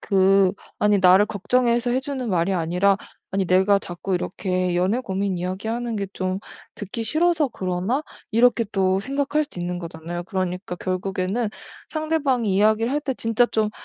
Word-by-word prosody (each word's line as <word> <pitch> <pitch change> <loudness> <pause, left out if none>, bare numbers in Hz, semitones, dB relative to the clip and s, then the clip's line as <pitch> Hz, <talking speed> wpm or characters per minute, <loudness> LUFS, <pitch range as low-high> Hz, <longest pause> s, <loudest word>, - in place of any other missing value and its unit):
그 195 -1 +4 0.3
'아니 210 -1 +3
나를 185 +2 +6
걱정해서 235 +3 +1
해주는 260 -1 -2
말이 180 0 +1
아니라 180 +3 +2 0.3
아니 190 -1 0
내가 190 +3 +4
자꾸 185 +1 -4
이렇게 180 0 -1
연애 190 +7 +1
고민 195 -4 -2
이야기하는 220 +6 -3
게 200 -1 -2
좀 185 0 -2 0.4
듣기 215 +3 -5
싫어서 315 0 +2
그러나?' 190 +7 -2 0.3
이렇게 235 +1 +4
또 190 -2 +1
생각할 280 +5 0
수도 285 - -12
있는 175 0 -3
거잖아요. 170 +1 -6
그러니까 185 +1 -3
결국에는 190 +4 -2 0.4
상대방이 285 - 0
이야기를 220 +4 +3
할 295 - +1
때 275 -3 -2
진짜 230 +1 +2
좀 220 -2 0
200 Hz, 350 characters per minute, -23 LUFS, 185-240 Hz, 0.4 s, 나를